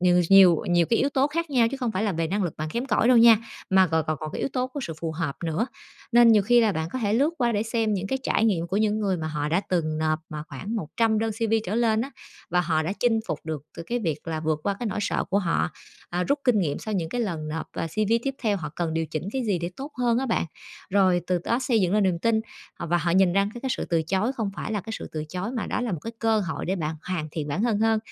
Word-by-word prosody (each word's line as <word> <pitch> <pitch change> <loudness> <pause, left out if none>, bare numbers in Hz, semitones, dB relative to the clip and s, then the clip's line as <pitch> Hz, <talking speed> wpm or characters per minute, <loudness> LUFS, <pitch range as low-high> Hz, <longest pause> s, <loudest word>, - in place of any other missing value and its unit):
nhiều 180 0 +4
s 170 - -5
nhiều 190 -3 +8
nhiều 175 -1 +4
cái 230 - +4
yếu 275 - +2
tố 275 -1 +2
khác 330 +2 -3
nhau 245 -4 +4
chứ 275 - -3
không 250 -4 -2
phải 190 - -1
là 210 -2 +1
về 165 -1 -1
năng 200 +5 -1
lực 175 -4 -3
bạn 155 +1 -3
kém 240 +9 -2
cỏi 230 -1 +2
đâu 250 - +6
nha, 230 -1 +8 0.3
mà 190 0 +5
còn 160 -2 0
còn 155 - 0
còn 155 - -4
cái - - -4
yếu - - 0
tố 255 -1 0
của 260 +3 -6
sự 165 - -4
phù 165 -1 -2
hợp 160 -3 -3
nữa. 165 +8 0 0.5
Nên 240 0 +7
nhiều 210 -2 +5
khi 240 +4 +5
là 220 -3 +3
bạn 160 -2 -2
có 260 - -2
thể 210 -4 0
lướt 280 +7 +3
qua 240 -3 +2
để 210 -1 +1
xem 225 -1 0
những 195 0 -2
cái 265 +7 -1
trải 225 - +1
nghiệm 180 -7 +1
của 185 +3 -2
những 215 0 +2
người 195 -3 +1
mà 160 -2 -4
họ 150 -1 -2
đã 170 +4 +2
từng 155 -4 0
nộp 155 0 +1
mà 150 -1 -5
khoảng 195 - -5
100 220 +5 0
đơn 225 +1 0
CV 225 0 0
trở 190 - -3
lên 225 -2 +2
á, 265 +4 -3 0.4
và 180 +1 +3
họ 160 -2 +1
đã 165 +4 -2
chinh 230 -2 +3
phục 150 - -2
được 155 -3 -4
từ - - -5
cái 245 - -1
việc 160 -9 -2
là 160 -1 -2
vượt 155 -1 -1
qua 200 - 0
cái 240 - -2
nỗi 205 -1 -2
sợ - - 0
của 200 - +3
họ, 180 -3 0 0.4
à, 180 +1 -1
rút 280 +8 +1
kinh 250 -5 +4
nghiệm 155 -7 0
sau 215 - -4
những 170 -4 -1
cái 245 - -2
lần 165 -9 -3
nộp, 160 +1 -4
à, - - -3
CV 215 +7 +1
tiếp 275 +1 -2
theo 210 -4 +2
họ 155 -5 -5
cần 165 -2 -1
điều 165 0 0
chỉnh 155 +1 -4
cái 265 - -1
gì 200 -4 +1
để 170 +1 -3
tốt 280 +3 -7
hơn 240 -1 +2
á 265 - -1
bạn. 225 - +1 0.5
Rồi 185 -2 +3
từ 180 -1 +1
đó 235 - +1
xây 245 -4 +1
dựng 180 -2 +1
lên 210 - +3
niềm 180 -3 +1
tin, 220 +4 +2 0.3
à, - - -6
và 175 +2 +2
họ 170 +1 0
nhìn 185 0 +4
ra 200 +2 +2
cái 240 - -7
cái 265 - -3
sự - - -3
từ 165 -2 +1
chối 190 +9 0
không 225 -6 -2
phải 220 - -4
là 210 - -1
cái 220 - -8
sự - - -7
từ 155 -1 -3
chối 180 +6 -4
mà 225 - -2
đó - - -2
là 245 -4 -2
một 170 - -3
cái 230 - -5
cơ 225 -1 +2
hội 165 -5 -4
để 190 +2 0
bạn 160 -2 -2
hoàn 165 -4 -2
thiện 150 -1 -4
bản 160 +9 -1
thân 230 -4 +1
hơn. 225 0 +3
195 Hz, 305 wpm, -25 LUFS, 165-230 Hz, 0.5 s, nhiều